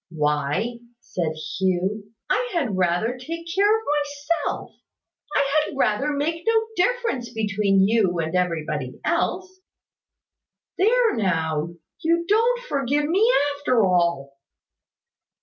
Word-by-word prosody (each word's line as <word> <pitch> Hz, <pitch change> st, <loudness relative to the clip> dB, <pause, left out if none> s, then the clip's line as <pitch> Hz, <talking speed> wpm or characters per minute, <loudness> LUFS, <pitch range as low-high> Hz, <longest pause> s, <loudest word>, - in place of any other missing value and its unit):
"Why," 150 Hz, +8 st, -1 dB, 0.2 s
said 165 Hz, -8 st, -3 dB, 0.3 s
Hugh, 190 Hz, +3 st, -1 dB, 0.2 s
"I -, -, 0 dB
had 275 Hz, -, 0 dB
rather 185 Hz, +6 st, +1 dB
take 330 Hz, +6 st, -6 dB
care 410 Hz, +3 st, +4 dB
of 445 Hz, -, -10 dB
myself. 290 Hz, +2 st, -2 dB, 0.6 s
I 280 Hz, -, +3 dB, 0.2 s
had -, -, -8 dB
rather 275 Hz, +4 st, +1 dB
make 315 Hz, +4 st, -2 dB
no 455 Hz, 0 st, +5 dB, 0.2 s
difference 360 Hz, -, 0 dB
between 205 Hz, -3 st, +2 dB
you 205 Hz, -5 st, +2 dB
and 160 Hz, 0 st, -2 dB
everybody 155 Hz, -7 st, -2 dB
else." 370 Hz, +2 st, -1 dB, 1.2 s
"There 460 Hz, +4 st, +4 dB
now! 165 Hz, -5 st, -1 dB, 0.2 s
You 335 Hz, +1 st, +1 dB
don't 465 Hz, +4 st, +3 dB
forgive 285 Hz, -, 0 dB
me, 405 Hz, +9 st, +3 dB, 0.3 s
after 250 Hz, -7 st, +2 dB
all." 170 Hz, -7 st, 0 dB
235 Hz, 115 wpm, -23 LUFS, -, 1.2 s, no